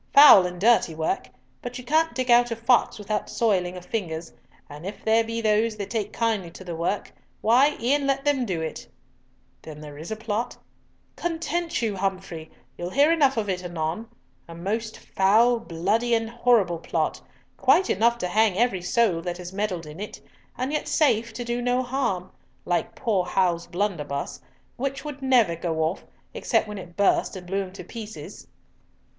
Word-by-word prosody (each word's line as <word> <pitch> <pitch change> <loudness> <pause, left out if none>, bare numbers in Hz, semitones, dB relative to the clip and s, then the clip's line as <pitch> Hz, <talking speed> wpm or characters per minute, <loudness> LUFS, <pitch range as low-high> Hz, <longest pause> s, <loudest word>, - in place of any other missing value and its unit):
Foul 275 -10 +10
and 180 0 -8
dirty 215 -6 +3
work, 160 -5 -2 0.3
but 245 +1 -6
you 250 - -8
can't 315 +6 +1
dig 255 -1 0
out 240 0 +6
a 230 - -2
fox 235 +1 +2
without 210 0 -3
soiling 185 -6 0
of 180 - -10
fingers, 170 -6 -4 0.3
and 150 +2 -10
if 195 +3 -7
there 225 +1 +4
be 230 +1 -3
those 215 0 +2
that 200 -2 -5
take 215 -3 -2
kindly 220 -6 -1
to 175 - -11
the 175 -2 -5
work, 170 +5 -2 0.3
why, 260 +7 +4
e'en 275 +4 +1
let 275 0 0
them 285 -3 +2
do 185 -8 -2
it." 160 -1 -5 0.7
"Then 155 -2 -10
there 150 -1 -10
is 160 - -7
a 220 - -2
plot?" 220 +1 -3 0.6
"Content 340 -3 -2
you, 215 -3 0
Humfrey! 185 -4 -3 0.3
You'll 175 0 -3
hear 285 - +4
enough 280 -6 +3
of 215 -2 0
it 185 -2 -2
anon. 175 +5 -3 0.4
A 165 - -10
most 220 +6 -3
foul, 225 +5 +3
bloody, 225 +5 0
and 225 0 -2
horrible 230 -8 +2
plot, - - -2 0.3
quite 380 - +4
enough 235 +4 +2
to 180 - -2
hang 210 0 +2
every 220 -5 +1
soul 180 -2 +2
that 175 0 -4
has 180 0 -8
meddled 190 -5 -2
in 150 +3 -10
it, 210 - -7 0.4
and 255 +4 -2
yet 300 - -1
safe 235 -7 +2
to 245 +2 -5
do 240 +1 -2
no 245 +1 +1
harm—like 225 -4 -3
poor 215 -7 0
Hal's 180 -2 0
blunderbuss, 170 -7 -3 0.4
which 275 +3 -3
would 290 -2 -6
never 245 -10 +3
go 165 -1 -1
off, 160 +4 -2 0.3
except - - 0
when 210 -1 -6
it 175 -2 -11
burst, 200 0 +2
and 185 -1 -8
blew 195 +2 -1
him 185 -1 -7
to - - -8
pieces." 220 -2 -9
215 Hz, 180 wpm, -25 LUFS, 180-240 Hz, 0.7 s, Foul